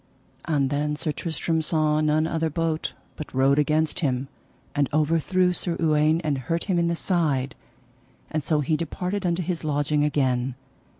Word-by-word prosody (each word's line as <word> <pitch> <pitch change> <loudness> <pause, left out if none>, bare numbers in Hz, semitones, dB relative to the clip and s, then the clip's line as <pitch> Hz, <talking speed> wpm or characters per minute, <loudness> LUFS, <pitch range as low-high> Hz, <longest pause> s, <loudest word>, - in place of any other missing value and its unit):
And 145 -5 +1
then 150 +1 0
Sir 155 +1 -2
Tristram 160 0 -1
saw 155 -1 +2
none 155 +1 +2
other 160 0 0
bote, 160 0 -1 0.2
but 155 - -7
rode 135 +2 +4
against 155 +3 +1
him, 135 -4 -1 0.4
and 145 -2 +1
overthrew 165 +4 +2
Sir 170 -1 -2
Uwaine 155 0 +3
and 145 -3 0
hurt 165 +7 -2
him 185 -4 +1
in 170 - +2
the 170 - 0
side, 150 -8 0 0.8
and 155 -2 -1
so 150 0 +1
he 155 +3 +1
departed 180 +4 -2
unto 175 +1 0
his 170 -1 -3
lodging 145 0 +1
again. 130 -4 +1
155 Hz, 165 wpm, -25 LUFS, 145-165 Hz, 0.8 s, rode